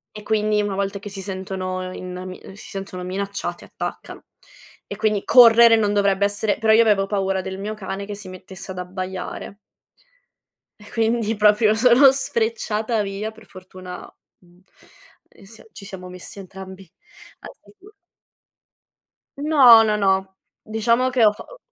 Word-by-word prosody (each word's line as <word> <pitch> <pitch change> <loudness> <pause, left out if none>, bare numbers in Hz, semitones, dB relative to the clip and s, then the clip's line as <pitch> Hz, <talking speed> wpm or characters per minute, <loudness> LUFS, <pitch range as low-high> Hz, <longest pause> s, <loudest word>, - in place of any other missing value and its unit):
e 210 - -9
quindi 215 -1 +1
una 205 -1 -3
volta 200 +1 -3
che 205 +1 -9
si 195 0 -7
sentono 185 -1 -5
in 180 0 -7
mi 185 0 -8 0.2
si 210 - -12
sentono 195 -2 -7
minacciati 200 +2 -5
attaccano; - - -7 0.6
e 200 - -6
quindi 215 -1 0
correre 235 -2 +7
non 210 -2 +1
dovrebbe 200 -1 +2
essere 205 +1 -1
però 220 -1 +2
io 225 - +6
avevo 205 -3 +3
paura 195 -2 -1
del 190 +1 -7
mio 210 +2 -4
cane 200 -1 -6
che 205 0 -7
si 200 -2 -10
mettesse 190 +1 -10
ad 185 - -7
abbaiare 185 +2 -6 1.2
e 210 - -15
quindi 225 -1 0
proprio 210 +1 +4
sono 250 +4 +6
sfrecciata 225 -3 -1
via 200 +2 -4
per 220 -1 -18
fortuna, 185 -1 -11 0.3
mhmm, 175 0 -25 0.7
ehm, - - -20
s 220 +3 -16
ci 200 - -12
siamo 190 -2 -9
messi 180 +2 -10
entrambi 190 -1 -11 0.5
al - - -11
sicuro. 410 +1 -19 1.5
No, 270 -7 +7
no, 215 -1 +1
no, 190 -1 0 0.3
diciamo 230 +4 +1
che 250 -3 +2
ho 210 - +6
fa - - -11
o - - -15
205 Hz, 155 wpm, -21 LUFS, 190-220 Hz, 1.5 s, correre